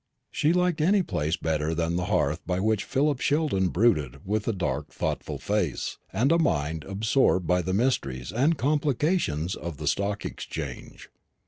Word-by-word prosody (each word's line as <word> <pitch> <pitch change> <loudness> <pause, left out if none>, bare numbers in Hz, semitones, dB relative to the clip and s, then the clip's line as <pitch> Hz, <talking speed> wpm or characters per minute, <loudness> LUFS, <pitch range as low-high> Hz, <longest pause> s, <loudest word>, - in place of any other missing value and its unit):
She 150 - +2
liked 180 -2 +1
any 190 +4 +4
place 80 - -1
better 80 0 -1
than 85 +1 0
the 90 +1 -1
hearth 85 -5 +1
by 90 0 0
which 110 +1 +1
Philip 140 0 +1
Sheldon 145 - +1
brooded 85 - +1
with 105 +2 -1
a - - +3
dark 90 -10 -2
thoughtful - - -3
face, - - -2
and 120 +10 +2
a 165 - +4
mind 80 - 0
absorbed 100 -1 +2
by 90 +2 +2
the 90 +2 -3
mysteries 70 - 0
and 140 +8 +2
complications 140 - +1
of 85 -3 -6
the 75 - -6
Stock 100 +8 -1
Exchange. - - -7
100 Hz, 160 wpm, -26 LUFS, -, -, any